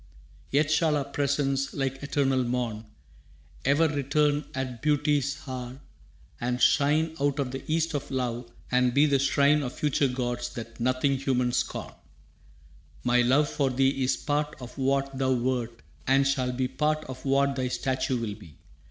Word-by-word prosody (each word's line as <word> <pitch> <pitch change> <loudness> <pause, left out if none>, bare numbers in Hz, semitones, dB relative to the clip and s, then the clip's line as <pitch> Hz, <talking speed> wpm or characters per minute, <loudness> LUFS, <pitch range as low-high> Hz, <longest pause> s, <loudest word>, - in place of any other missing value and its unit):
Yet 145 +2 +2
shall 155 -1 +3
our 140 - -2
presence, 140 -1 -1
like 135 -1 -2
eternal 135 -2 +1
morn, 120 -3 -2 0.8
Ever 145 +5 +4
return 145 0 +1
at 130 -3 -4
Beauty's 145 -2 +1
hour, 130 0 -6 0.6
and 125 +1 -1
shine 155 +4 +3
Out 145 -1 +1
of 135 -3 -1
the 135 - -6
East 165 0 +1
of 145 - -3
Love, 120 -2 -3 0.2
and 125 -1 +2
be 145 +2 +6
the 140 -2 +2
shrine 140 +2 +3
Of 125 -3 -4
future 145 -1 +1
gods 120 -1 -2
that 115 0 -8
nothing 130 +3 +1
human 125 -2 +1
scorn. 120 -1 -2 1.1
«My 125 0 +3
love 135 +5 +3
for 140 -2 0
thee 135 +1 +1
is 130 - +1
part 150 0 -1
of 125 -2 -9
what 135 0 0
thou 130 0 +1
wert 120 -2 -2 0.2
And 135 +1 +4
shall 130 -2 0
be 130 +1 -1
part 155 +3 0
of 130 -1 -9
what 140 0 +2
thy 130 -1 -1
statue 130 0 -1
will 110 -3 -3
be. 95 -8 -14
135 Hz, 160 wpm, -27 LUFS, 125-145 Hz, 1.1 s, be